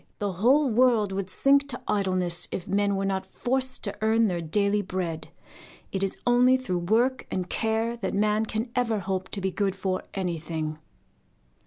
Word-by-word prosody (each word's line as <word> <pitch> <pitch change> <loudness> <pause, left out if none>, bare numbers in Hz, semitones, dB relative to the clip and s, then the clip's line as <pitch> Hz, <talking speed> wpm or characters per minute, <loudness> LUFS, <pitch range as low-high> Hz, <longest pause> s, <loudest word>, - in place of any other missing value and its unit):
The 205 -1 -2
whole 255 - +3
world 235 -4 +3
would 190 -1 -3
sink 280 +7 +3
to 250 -3 -5
idleness 185 -3 0
if 180 - -5
men 200 +1 +1
were 195 0 -1
not 190 -1 -1
forced 255 +7 -1
to - - -1
earn 225 +1 +3
their 175 -2 -2
daily 200 +5 +1
bread. 180 -4 -4 0.6
It 195 - -2
is 195 -1 -1
only 250 +1 +5
through 215 -9 -2
work 245 +4 +2
and 180 -1 -2
care 225 +3 -1
that 195 -4 -3
man 210 +2 +2
can 225 +3 -3
ever 235 -3 +1
hope 190 0 -3
to 200 - -1
be 190 0 -1
good 195 0 -1
for 190 -1 -2
anything. 160 -4 -3
200 Hz, 175 wpm, -26 LUFS, 185-230 Hz, 0.6 s, only